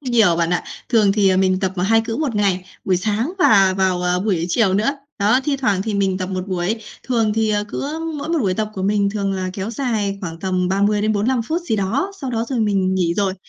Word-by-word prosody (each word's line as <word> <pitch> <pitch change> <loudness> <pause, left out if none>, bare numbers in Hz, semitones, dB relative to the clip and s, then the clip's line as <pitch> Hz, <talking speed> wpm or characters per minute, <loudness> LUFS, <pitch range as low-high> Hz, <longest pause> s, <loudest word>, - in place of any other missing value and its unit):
nhiều 230 - +3
bạn 170 0 0
ạ. 180 - 0 0.2
Thường 215 -5 +4
thì, 200 -2 +3
à, 185 - +3
mình 185 0 +2
tập 190 -1 -1
2 225 +2 +4
cữ 225 0 -4
1 285 -7 -1
ngày, 190 -3 +1 0.2
buổi 185 -2 +2
sáng 220 - -1
và 195 - +5
vào, 185 -2 +1
ờ, 180 0 +1
buổi 185 -5 0
chiều 190 0 +2
nữa, 215 +7 +2 0.3
đó, 215 +6 +3
thi 285 -2 0
thoảng 205 -8 0
thì 215 -1 -3
mình 195 -1 +1
tập 185 - -2
1 185 0 -4
buổi. 185 +5 -2 0.2
Thường 225 -4 +1
thì, 220 -1 +1
ờ, 205 0 0
cứ 300 +8 -4 0.2
mỗi 290 +3 -5
một 335 -1 +1
buổi 190 -7 0
tập 215 +1 -2
của 190 - -4
mình 200 0 +1
thường 200 -2 -2
là 185 -1 -3
kéo 195 +3 -4
dài 215 -6 -2
khoảng 165 -3 -6
tầm 185 -1 0
30 205 +2 +1
đến 215 0 +2
45 230 +4 +1
phút 330 +8 -2
gì 225 -10 -1
đó, 255 - -1
sau 265 -2 -3
đó 230 -1 -1
rồi 250 -4 -1
mình 195 -3 +1
nghỉ 170 -2 +1
rồi, 195 -1 0
205 Hz, 250 wpm, -20 LUFS, 190-225 Hz, 0.3 s, và